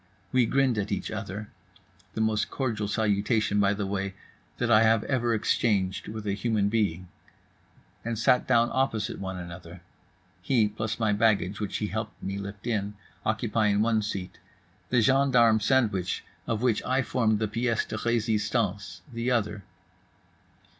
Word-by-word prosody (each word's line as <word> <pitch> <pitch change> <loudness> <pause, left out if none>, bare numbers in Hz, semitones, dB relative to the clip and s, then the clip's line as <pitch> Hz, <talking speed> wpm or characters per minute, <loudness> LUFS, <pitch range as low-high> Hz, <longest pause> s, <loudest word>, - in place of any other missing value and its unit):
We 125 -2 +3
grinned 130 -4 +2
at 100 - -3
each - - -2
other 105 +2 -5 0.7
(the 110 - -1
most 110 -1 +1
cordial 110 -6 -2
salutation, 105 0 +1
by 100 0 +3
the 100 0 -2
way, 95 -1 -3 0.4
that 120 -1 0
I 110 -1 +7
have 110 -1 +4
ever 120 -3 0
exchanged 100 -3 0
with 110 0 -6
a 100 - 0
human 105 -1 0
being) 100 -5 0 1.0
and 115 -1 -3
sat 125 +3 +3
down 120 0 +3
opposite 120 -5 -1
one 95 -1 -4
another—he, 90 +6 -4
plus 110 +2 -3
my 110 -2 +2
baggage 105 -2 +2
which 105 -2 -2
he 105 - -2
helped 110 0 -5
me 100 +1 -3
lift 100 +1 -8
in, 105 -3 -1 0.3
occupying 110 -2 +1
one 110 -1 +2
seat; 100 -3 -5 0.5
the 125 -2 +3
gendarme 125 -3 +4
sandwich, 105 -6 +1 0.2
of 115 0 -1
which 120 -4 +2
I 130 +1 +1
formed 110 -4 +1
the 110 0 -1
pièce 115 +1 -1
de - - -4
résistance, 105 -5 -1
the 115 +1 -1
other. 105 -4 0
110 Hz, 150 wpm, -27 LUFS, 100-115 Hz, 1.0 s, I